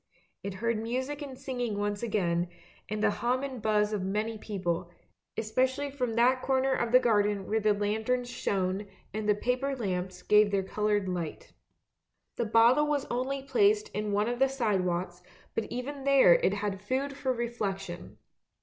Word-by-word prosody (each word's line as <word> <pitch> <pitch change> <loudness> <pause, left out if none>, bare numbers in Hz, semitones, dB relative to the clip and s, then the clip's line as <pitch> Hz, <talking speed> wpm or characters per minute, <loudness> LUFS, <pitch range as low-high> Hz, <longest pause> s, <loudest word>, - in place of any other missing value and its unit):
It 200 -1 -5
heard 230 +2 -1
music 260 +6 -3
and 270 -3 -7
singing 245 -6 -3
once 205 0 -1
again, 180 -6 0 0.4
and 215 +1 -2
the 215 - +4
hum 250 +5 0
and 260 -4 -5
buzz 210 0 +2
of 205 - -1
many 210 +4 -1
people, 180 -5 -3 0.5
especially 260 +6 0
from 250 -5 -2
that 250 +2 +4
corner 265 0 +2
of 235 -3 0
the 250 - +8
garden 210 -5 +2
where 220 +1 +1
the 210 -1 +2
lanterns 220 +5 0
shone 195 -3 -1 0.3
and 215 0 -2
the 210 - +5
paper 255 +5 -1
lamps 185 -5 -3
gave 210 0 +5
their 200 -1 +1
coloured 210 0 0
light. 175 -4 -4 0.8
The 235 - 0
bottle 235 +7 +5
was 290 -2 0
only 265 +3 -2
placed 410 - +3
in 210 0 -3
one 205 +2 +1
of 240 0 -2
the 270 0 +4
side 220 -8 +1
walks, 175 0 -2 0.3
but 225 - -1
even 265 +3 -5
there 275 -9 +7
it 190 +3 +2
had 200 -2 -3
food 265 +6 -2
for 265 -2 -1
reflection. 200 -7 -4
220 Hz, 170 wpm, -29 LUFS, 205-255 Hz, 0.8 s, the